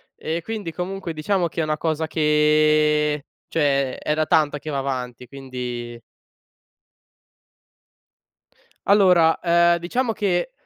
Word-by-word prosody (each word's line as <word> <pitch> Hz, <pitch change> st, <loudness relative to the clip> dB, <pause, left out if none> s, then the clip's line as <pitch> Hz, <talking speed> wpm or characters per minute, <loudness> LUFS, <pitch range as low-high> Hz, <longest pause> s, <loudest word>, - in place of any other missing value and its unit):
Ehm, 165 Hz, +2 st, -4 dB
quindi 210 Hz, -3 st, -5 dB
comunque 180 Hz, 0 st, -5 dB
diciamo 175 Hz, +3 st, 0 dB
che 165 Hz, -, -4 dB
è -, -, 0 dB
una 155 Hz, 0 st, -1 dB
cosa 160 Hz, 0 st, -2 dB
che 150 Hz, -1 st, +2 dB, 0.2 s
cioè 140 Hz, -4 st, 0 dB
è 150 Hz, -, -2 dB
da 155 Hz, 0 st, 0 dB
tanto 150 Hz, -1 st, +2 dB
che 155 Hz, +2 st, -8 dB
va 140 Hz, -, -2 dB
avanti 125 Hz, -2 st, -5 dB
quindi 125 Hz, -3 st, -7 dB, 2.9 s
Allora, 180 Hz, -5 st, +4 dB
ehm, 170 Hz, 0 st, +3 dB
diciamo 235 Hz, +8 st, -1 dB
che 195 Hz, +3 st, -1 dB
155 Hz, 120 wpm, -22 LUFS, 145-170 Hz, 2.9 s, Allora